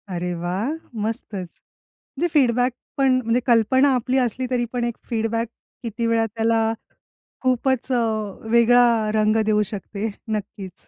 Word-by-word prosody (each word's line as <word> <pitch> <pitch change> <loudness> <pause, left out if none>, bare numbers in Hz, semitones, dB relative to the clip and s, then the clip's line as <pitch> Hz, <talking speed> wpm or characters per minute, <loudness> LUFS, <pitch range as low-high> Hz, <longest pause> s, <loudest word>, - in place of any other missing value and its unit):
अरे 175 +1 -2
वाह! 185 +7 -2 0.4
मस्तच 210 -4 -4 0.7
म्हणजे 345 +4 +1
फीडबॅक 250 -3 +3 0.3
पण 260 -2 +3
म्हणजे 230 +2 +2
कल्पना 260 +4 +4
आपली 250 +2 0
असली 255 0 0
तरी 240 -1 +1
पण 245 -1 -1
एक 235 -1 -2
फीडबॅक 230 0 -1 0.4
किती 230 +1 -3
वेळा 230 0 +2
त्याला, 225 +1 +1 0.8
खूपच 260 0 0
अ, 250 - +3 0.5
वेगळा 235 -2 +5
रंग 215 0 +3
देऊ 210 -1 +3
शकते 205 +1 -5 0.3
नक्कीच. 195 -2 -8
230 Hz, 130 wpm, -22 LUFS, 215-250 Hz, 0.8 s, वेगळा